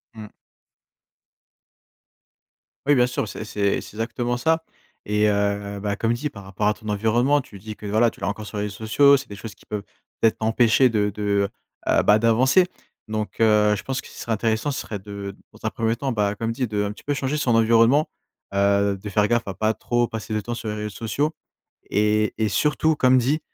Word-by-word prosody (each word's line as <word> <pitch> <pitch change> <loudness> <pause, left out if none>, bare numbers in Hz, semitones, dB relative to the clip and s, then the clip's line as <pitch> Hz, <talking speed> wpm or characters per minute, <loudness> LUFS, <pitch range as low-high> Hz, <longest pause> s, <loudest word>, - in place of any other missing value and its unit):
Mmh. 110 -1 -10 2.5
Oui, 145 +1 +5
bien 125 -1 +4
sûr. 120 - -2
C'est 110 - -6
c'est 100 -2 0
c'est - - -11
exactement 120 +2 -2
ça 160 +4 +1 0.4
et 105 0 +2
heu, 100 0 -1
bah, 100 0 -1
comme 115 +3 0
dit 140 +6 -3
par 100 -7 -11
rapport 95 +2 -2
à 105 - +3
ton 110 0 -13
environnement, 115 +7 +2
tu 105 -6 -13
dis 110 +2 -8
que, 105 - -11
voilà, 110 +3 +3
tu - - -17
l'as 100 - -1
encore 105 +1 -5
sur 105 0 -7
les 105 - -1
réseaux 105 -1 -4
sociaux. 140 +5 +6
C'est 135 -1 -8
des 100 - -7
choses 105 +2 -9
qui - - -22
peuvent 105 -1 -4 0.4
peut-être 115 - +4
empêcher 115 +3 +4
de 105 -3 +1
de, 100 -1 0 0.4
heu, - - +4
bah, 105 +1 +5
d'avancer. 125 - +4 0.4
Donc, 110 0 -4
heu, 105 -2 +4
je 100 - -6
pense 135 -1 -3
que - - -14
ce - - -14
qui - - -14
serait 115 - -2
intéressant, 110 +5 0
ce 135 - -3
serait 105 - -6
de, 100 +2 -12
heu, 100 -1 -5
de - - -22 0.2
dans - - -16
un - - +2
1er 115 0 -1
temps, 135 +2 -2
bah, 105 -3 0
comme 115 +2 -2
dit, 125 +2 -2
de 105 -1 -1
un 100 - -2
petit - - -16
peu 145 - -1
changer 140 +1 -1
son 125 -6 +2
environnement, 115 +6 +4 0.4
heu, 100 0 +2
de 105 - -6
faire 105 +1 +2
gaffe 120 0 0
à 100 - -3
pas 110 +4 0
trop 120 +1 0
passer 110 0 -5
de 105 - 0
temps 120 +3 -5
sur 115 -1 -6
les 105 - -3
réseaux 105 0 -4
sociaux 115 +8 -2 0.6
et 105 +1 +2
et 110 -1 +1
surtout 150 +9 +2
comme 130 -1 +5
dit, 135 +5 +2
110 Hz, 225 wpm, -23 LUFS, 105-120 Hz, 2.5 s, sociaux